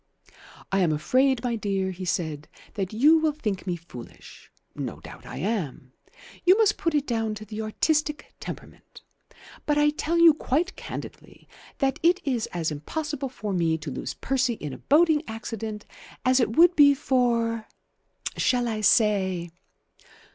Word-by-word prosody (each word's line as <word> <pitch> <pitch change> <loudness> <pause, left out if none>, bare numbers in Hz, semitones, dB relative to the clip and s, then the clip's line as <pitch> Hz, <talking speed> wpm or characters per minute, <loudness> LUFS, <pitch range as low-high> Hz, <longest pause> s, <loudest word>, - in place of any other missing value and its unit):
"I 195 - +2
am 175 -4 +3
afraid, 255 - +2
my 240 -2 0
dear," 195 -3 -1
he 185 +1 -7
said, 155 -3 -2 0.3
"that 195 -3 -3
you 295 +9 +5
will 310 -1 +1
think 210 -10 -4
me 180 - 0
foolish. 140 -8 -13 0.2
No - - -5
doubt - - -12
I - - -7
am. 165 - -3 0.5
You 370 +3 +6
must 430 -2 +4
put 330 -2 0
it 290 -1 +1
down 225 -4 -1
to 215 0 -9
the 215 +1 -6
artistic 300 +7 -1
temperament. - - -10 0.6
But 295 -1 +2
I 295 0 +4
tell 320 +3 -1
you 335 -2 +8
quite 315 +5 -1
candidly - - -9 0.3
that 270 -1 0
it 350 +3 +4
is 250 -6 -1
as 165 -3 -3
impossible 280 - -4
for 215 -5 -5
me 165 -3 +1
to 150 -2 -7
lose - - -5
Percy 260 -2 0
in 150 -9 -6
a - - -9
boating 310 +1 +4
accident 220 -1 -6 0.4
as 255 +1 +4
it 225 -2 0
would 350 +1 +7
be 285 -1 +7
for 235 -4 0 0.7
shall 245 -1 +1
I 220 -2 -2
say? 190 -5 +2
230 Hz, 160 wpm, -26 LUFS, 190-295 Hz, 0.7 s, you